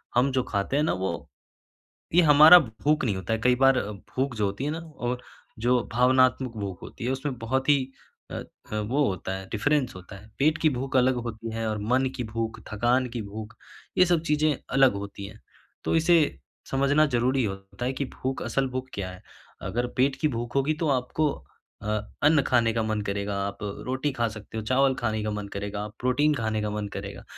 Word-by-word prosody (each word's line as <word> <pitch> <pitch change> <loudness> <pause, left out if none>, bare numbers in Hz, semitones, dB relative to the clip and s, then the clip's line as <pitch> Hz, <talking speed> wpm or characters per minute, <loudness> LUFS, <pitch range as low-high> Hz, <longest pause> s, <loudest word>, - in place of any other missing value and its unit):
हम 125 +3 +3
जो 130 - +3
खाते 100 +5 -2
हैं 150 - +3
ना 155 - +1
वो, - - -3 0.9
ये 180 - +8
हमारा 155 +4 +10
भूख 150 +3 0
नहीं 105 -5 0
होता 95 +3 -3
है 110 - 0
कई 125 0 +5
बार 135 0 +4
भूख 125 +6 -4
जो 105 -2 0
होती 100 +7 -3
है 150 - -1
ना 160 - -3
और 125 -7 -4 0.5
जो 125 0 +4
भावनात्मक 130 0 +3
भूख 100 -3 -5
होती - - -8
है, 125 - +1
उसमें 135 0 -3
बहुत 130 +4 -1
ही 145 - +7 0.5
अ - - -5
अ, - - -8
वो 130 +7 +1
होता 95 0 -3
है 95 0 -9
डिफरेंस 135 +3 +1
होता 90 +2 -10
है, 105 +3 -15
पेट 155 +3 +3
की 155 - +4
भूख 135 0 -1
अलग 130 0 +4
होती 115 0 -6
है 115 0 -2
और 110 - -2
मन 130 +1 +3
की 125 - -2
भूख, 110 +1 -4
थकान 120 +4 +2
की 120 -1 -4
भूख, 105 +2 -8 0.4
ये 185 - +7
सब 175 -2 +2
चीज़ें 150 0 +3
अलग 135 0 +5
होती 100 0 -6
हैं। 110 +1 -13 0.5
तो - - +1
इसे 170 +2 +5 0.5
समझना 140 +3 +3
ज़रूरी 130 0 +1
होता 95 +2 -6
है 130 - 0
कि 140 +1 -2 0.2
भूख 130 +1 -1
असल 135 -1 0
भूख 130 0 -4
क्या 95 -2 -4
है, 90 - -12 0.4
अगर 120 +2 -2
पेट 135 +2 +3
की 155 - +4
भूख 120 +2 -5
होगी 140 +3 +2
तो 155 - +2
आपको 140 +3 +1 0.5
अ, - - -5 0.4
अन्न 150 0 +5
खाने 120 -2 +3
का 115 - 0
मन 110 -1 -1
करेगा, 100 0 -2
आप 100 - -6 0.3
रोटी 130 +3 -1
खा 120 -3 0
सकते 105 +1 -9
हो, 110 - -3
चावल 130 +3 +3
खाने 110 -3 -1
का 105 - -2
मन 105 -1 -4
करेगा, 100 +1 -4
प्रोटीन 145 +5 +2
खाने 110 -4 -1
का 105 - -1
मन 105 -1 -3
करेगा - - -7
125 Hz, 210 wpm, -26 LUFS, 110-135 Hz, 0.9 s, हमारा